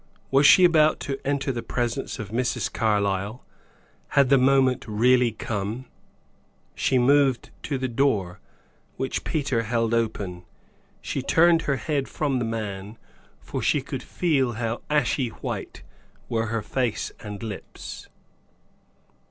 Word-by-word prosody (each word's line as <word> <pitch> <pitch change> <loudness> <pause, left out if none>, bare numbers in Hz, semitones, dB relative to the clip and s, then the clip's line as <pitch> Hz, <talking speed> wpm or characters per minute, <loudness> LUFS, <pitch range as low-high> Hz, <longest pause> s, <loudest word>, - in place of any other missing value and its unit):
Was 140 +2 +6
she 185 - +8
about 155 -3 +4
to 135 -1 -3
enter 140 -1 0
the 120 -2 -4
presence 120 -1 -2
of 105 -3 -7
Mrs. 125 +2 -1
Carlyle? 100 0 0 0.6
Had 140 -3 +3
the 140 - +6
moment 130 -1 +3
really 120 +3 +3
come? 110 +3 -4 0.9
She 130 - +1
moved 135 0 +3
to 140 - -2
the 130 0 -2
door, 115 -8 0 0.6
which 130 - -2
Peter 135 -7 0
held 115 0 0
open. 100 -6 -2 0.6
She 135 - -2
turned 165 +4 +4
her 140 - +3
head 140 +2 -2
from 140 -4 -1
the 120 - -1
man, 105 -2 -5 0.4
for - - -5
she - - +2
could - - -5
feel 140 -8 0
how 115 0 -3
ashy 140 -3 +1
white - - -6 0.5
were 115 -1 0
her 110 -1 -2
face 120 +1 -2
and 105 0 -7
lips. 105 -4 -8
125 Hz, 135 wpm, -25 LUFS, 110-135 Hz, 0.9 s, she